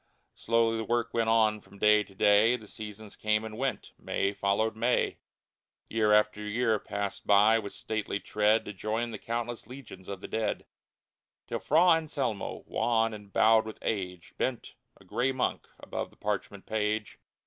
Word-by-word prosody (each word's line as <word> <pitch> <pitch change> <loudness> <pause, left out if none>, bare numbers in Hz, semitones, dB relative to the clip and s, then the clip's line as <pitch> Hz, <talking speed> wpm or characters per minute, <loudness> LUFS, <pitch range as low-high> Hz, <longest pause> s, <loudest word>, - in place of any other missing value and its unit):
Slowly 115 0 +1
the 110 - -2
work 120 +1 -1
went 115 -1 +1
on 110 -2 +3
from 100 - -17
day 105 +1 +5
to 95 - -19
day; 105 +4 +5
The 110 -4 -10
seasons 105 0 -9
came 105 0 0
and 110 -1 -7
went; 130 +2 -3
May 100 - -1
followed 100 +3 0
May; 120 +3 +1 0.7
Year 110 -1 +2
after 105 0 +3
year 110 +1 +1
passed 100 -1 -4
by 105 +2 +6
with 100 -2 -6
stately 110 -2 -3
tread 105 +2 +2
To 105 - -6
join 110 +4 -2
the 110 - -6
countless 120 -1 -4
legions 120 -8 -11
of 100 -2 -6
the - - -6
dead, 110 -2 -2 0.8
Till - - -3
Fra 165 +5 +4
Anselmo, 145 - 0
wan 115 -1 +1
and 105 -1 -10
bowed 110 +1 +4
with 110 - -7
age, 90 -5 -3
Bent, 130 -2 -2 0.3
a 95 - -19
gray 120 +7 0
monk, 130 -1 -1
above - - -5
the - - -24
parchment - - -3
page. 105 0 -2
110 Hz, 170 wpm, -29 LUFS, 105-115 Hz, 0.8 s, by